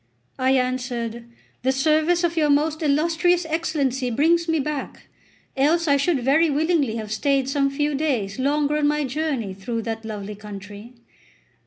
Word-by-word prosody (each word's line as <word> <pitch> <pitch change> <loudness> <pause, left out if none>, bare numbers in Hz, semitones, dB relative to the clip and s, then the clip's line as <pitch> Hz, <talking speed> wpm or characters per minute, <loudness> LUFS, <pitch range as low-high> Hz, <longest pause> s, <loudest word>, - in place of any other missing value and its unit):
I 260 +1 +3
answered: 245 -3 -2 0.4
"The 260 - +2
service 310 +5 +2
of 340 -1 0
your 305 -2 +2
most 300 +2 +2
illustrious 330 +4 +2
Excellency 295 -6 -1
brings 330 +7 +2
me 325 -1 +1
back, 295 0 -5 0.5
else 320 +5 +2
I 285 - +4
should 280 -1 +1
very 310 +6 +3
willingly 295 -5 +1
have 215 -2 -5
stayed 270 +4 +1
some 275 0 +1
few 295 +2 -1
days 260 -9 -1
longer 290 +2 +1
on 295 -1 +2
my 300 0 +1
journey 270 -7 -2
through 225 +4 -4
that 225 0 -4
lovely 210 -2 -6
country." 205 +2 -10
280 Hz, 155 wpm, -23 LUFS, 240-310 Hz, 0.5 s, I